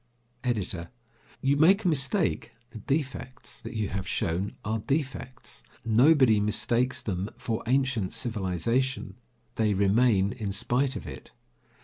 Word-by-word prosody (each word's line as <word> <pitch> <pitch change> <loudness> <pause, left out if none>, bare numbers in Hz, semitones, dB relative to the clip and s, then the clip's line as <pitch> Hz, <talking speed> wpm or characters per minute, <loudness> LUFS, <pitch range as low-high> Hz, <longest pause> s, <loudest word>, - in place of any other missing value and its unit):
EDITOR: 95 -8 -2 0.5
You 140 +1 +2
make 190 +8 +5
a - - +1
mistake. 140 - +1 0.2
The 110 - -8
defects 130 0 -4
that - - -8
you 105 -3 -1
have 95 0 -4
shown 95 0 -1
are 110 +1 -1
defects. 130 -1 -4 0.2
Nobody 120 0 +5
mistakes 115 +4 +1
them 95 0 -2
for 115 -2 -3
ancient 130 -6 +1
civilization. 115 +4 -1 0.4
They 110 -2 +2
remain 100 0 +3
in 105 -4 -4
spite 125 +6 0
of - - -6
it. - - -9
115 Hz, 125 wpm, -28 LUFS, 105-135 Hz, 0.5 s, make